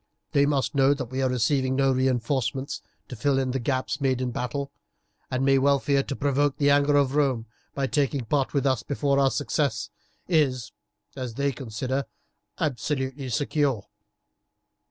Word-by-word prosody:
They 140 Hz, 0 st, +3 dB
must 140 Hz, -1 st, 0 dB
know 140 Hz, 0 st, +4 dB
that 130 Hz, -4 st, -6 dB
we 130 Hz, +1 st, -2 dB
are 130 Hz, -, +2 dB
receiving 130 Hz, +2 st, +1 dB
no 135 Hz, 0 st, +3 dB
reinforcements 130 Hz, 0 st, 0 dB, 0.3 s
to 125 Hz, -, -7 dB
fill 140 Hz, +5 st, +1 dB
the 135 Hz, 0 st, 0 dB
gaps 130 Hz, +2 st, -2 dB
made 130 Hz, -2 st, +1 dB
in 125 Hz, -1 st, -1 dB
battle, 140 Hz, +4 st, -3 dB, 0.6 s
and 130 Hz, +1 st, 0 dB
may 135 Hz, 0 st, +4 dB
well 140 Hz, +1 st, +4 dB
fear 140 Hz, 0 st, +1 dB
to 140 Hz, -, -5 dB
provoke 140 Hz, 0 st, +1 dB
the 145 Hz, -1 st, +3 dB
anger 145 Hz, 0 st, +4 dB
of 140 Hz, -2 st, +3 dB
Rome 135 Hz, -6 st, +1 dB, 0.3 s
by 140 Hz, -, 0 dB
taking 135 Hz, -2 st, 0 dB
part 135 Hz, +3 st, 0 dB
with 140 Hz, -1 st, 0 dB
us 130 Hz, -3 st, +2 dB
before 140 Hz, -1 st, 0 dB
our 135 Hz, -1 st, +4 dB
success 130 Hz, -7 st, -1 dB, 0.4 s
is, 135 Hz, -9 st, +1 dB, 0.4 s
as 125 Hz, -4 st, -5 dB
they 140 Hz, +1 st, +1 dB
consider, 130 Hz, +2 st, -3 dB, 0.5 s
absolutely 135 Hz, -1 st, -2 dB
secure." 135 Hz, -2 st, 0 dB
135 Hz, 160 wpm, -26 LUFS, 130-140 Hz, 0.6 s, know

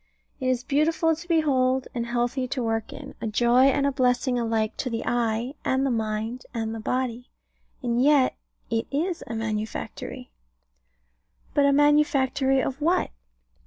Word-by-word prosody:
It 255 Hz, -, -2 dB
is 255 Hz, -1 st, +1 dB
beautiful 320 Hz, +3 st, +2 dB
to 330 Hz, +3 st, -11 dB
behold, 265 Hz, -6 st, +2 dB
and 235 Hz, -1 st, -3 dB
healthy 245 Hz, +2 st, -1 dB
to 250 Hz, 0 st, -2 dB
work 225 Hz, -1 st, -2 dB
in; 285 Hz, -1 st, -9 dB
a -, -, -2 dB
joy 240 Hz, +4 st, +4 dB
and 275 Hz, +1 st, +3 dB
blessing 250 Hz, 0 st, +1 dB
alike 225 Hz, -2 st, 0 dB
to 255 Hz, -, -2 dB
the 230 Hz, -1 st, -3 dB
eye, 235 Hz, +1 st, 0 dB
and 265 Hz, +1 st, +1 dB
the 270 Hz, -, +1 dB
mind, 220 Hz, +2 st, -2 dB
and 225 Hz, -1 st, -2 dB
the 225 Hz, -, -5 dB
body: 250 Hz, +1 st, -2 dB, 0.5 s
and 240 Hz, 0 st, +1 dB
yet 280 Hz, -1 st, +4 dB, 0.4 s
it 225 Hz, 0 st, 0 dB
is 330 Hz, +5 st, -2 dB
a 230 Hz, -, -4 dB
manufactory. 215 Hz, -, -4 dB, 1.2 s
But 285 Hz, -1 st, +4 dB
a -, -, +4 dB
manufactory 275 Hz, -2 st, +3 dB
of 270 Hz, +2 st, -4 dB
what? 340 Hz, +4 st, +1 dB
255 Hz, 155 wpm, -25 LUFS, 230-280 Hz, 1.2 s, joy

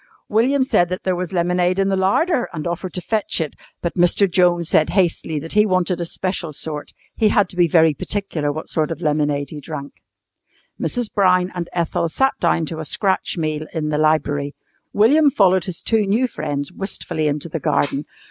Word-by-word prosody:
William 260 Hz, +6 st, +2 dB
said 175 Hz, -9 st, +2 dB
that 185 Hz, -, -4 dB
there 185 Hz, -1 st, 0 dB
was 180 Hz, 0 st, -4 dB
lemonade 180 Hz, 0 st, +1 dB
in 195 Hz, 0 st, +2 dB
the 195 Hz, -, +1 dB
larder 240 Hz, -, +1 dB
and 155 Hz, -3 st, -5 dB
offered 175 Hz, +2 st, -3 dB
to 180 Hz, -, -4 dB
fetch 215 Hz, -4 st, -1 dB
it, 160 Hz, -3 st, -2 dB, 0.3 s
but 170 Hz, -, -1 dB
Mr. 175 Hz, +3 st, +4 dB
Jones 175 Hz, -2 st, +2 dB
said 155 Hz, -, +3 dB
hastily 175 Hz, -4 st, +1 dB
that 160 Hz, +3 st, -4 dB
he 210 Hz, 0 st, +5 dB
wanted 185 Hz, -3 st, 0 dB
a -, -, -1 dB
special 180 Hz, -1 st, -3 dB
sort. 150 Hz, 0 st, -4 dB, 0.2 s
He 220 Hz, -2 st, +3 dB
had 205 Hz, -2 st, +3 dB
to -, -, -8 dB
be 175 Hz, -1 st, +4 dB
very 160 Hz, -1 st, +4 dB
particular 160 Hz, -3 st, -3 dB
what 155 Hz, +2 st, -6 dB
sort 155 Hz, -2 st, 0 dB
of 165 Hz, -, -4 dB
lemonade 150 Hz, -3 st, 0 dB
he 150 Hz, -, -7 dB
drank. 145 Hz, -2 st, -7 dB, 0.9 s
Mrs. 245 Hz, -3 st, -2 dB
Brown 185 Hz, -2 st, +3 dB
and 175 Hz, -2 st, -4 dB
Ethel 170 Hz, 0 st, -1 dB
sat 270 Hz, +10 st, +1 dB
down 165 Hz, -, +1 dB
to 160 Hz, +1 st, -6 dB
a -, -, -3 dB
scratch 190 Hz, +5 st, 0 dB
meal 155 Hz, -1 st, -2 dB
in 155 Hz, -1 st, -1 dB
the 150 Hz, 0 st, 0 dB
library. 150 Hz, -2 st, +1 dB, 0.4 s
William 285 Hz, +9 st, +5 dB
followed 190 Hz, -, +3 dB
his 180 Hz, -3 st, -5 dB
two 220 Hz, -3 st, +1 dB
new 230 Hz, +6 st, +2 dB
friends 145 Hz, -, -4 dB
wistfully 165 Hz, -5 st, -3 dB
into 150 Hz, +2 st, -2 dB
the 165 Hz, 0 st, -4 dB
garden. 140 Hz, 0 st, 0 dB
175 Hz, 195 wpm, -20 LUFS, 155-195 Hz, 0.9 s, he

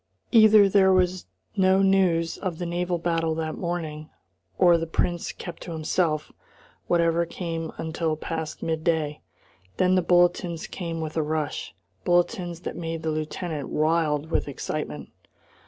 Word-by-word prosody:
Either 215 Hz, -3 st, +7 dB
there 190 Hz, -1 st, +5 dB
was 185 Hz, -1 st, +1 dB, 0.3 s
no 190 Hz, 0 st, +4 dB
news 185 Hz, -4 st, +3 dB
of 185 Hz, -5 st, -3 dB
the 175 Hz, -, -4 dB
naval 175 Hz, +1 st, -1 dB
battle 165 Hz, -1 st, 0 dB
that 160 Hz, -1 st, -3 dB
morning, 160 Hz, -3 st, -4 dB, 0.5 s
or 175 Hz, -2 st, +6 dB
the 165 Hz, 0 st, -1 dB
Prince 175 Hz, +1 st, -1 dB
kept 175 Hz, -2 st, -9 dB
to 170 Hz, -, -6 dB
himself 155 Hz, 0 st, 0 dB, 0.6 s
whatever 170 Hz, -1 st, +2 dB
came 165 Hz, -1 st, -4 dB
until 160 Hz, -1 st, -2 dB
past 160 Hz, 0 st, -5 dB
midday. 160 Hz, -2 st, -1 dB, 0.6 s
Then 185 Hz, 0 st, +3 dB
the 185 Hz, -, +4 dB
bulletins 175 Hz, -1 st, +2 dB
came 165 Hz, -3 st, -5 dB
with 155 Hz, 0 st, -5 dB
a -, -, +3 dB
rush, 150 Hz, -10 st, -3 dB, 0.3 s
bulletins 175 Hz, -1 st, +1 dB
that -, -, -5 dB
made 165 Hz, -1 st, -4 dB
the 160 Hz, -, 0 dB
lieutenant 155 Hz, -1 st, -4 dB
wild 155 Hz, -1 st, +1 dB
with -, -, 0 dB
excitement. 130 Hz, -, -5 dB
165 Hz, 140 wpm, -25 LUFS, 160-175 Hz, 0.6 s, Either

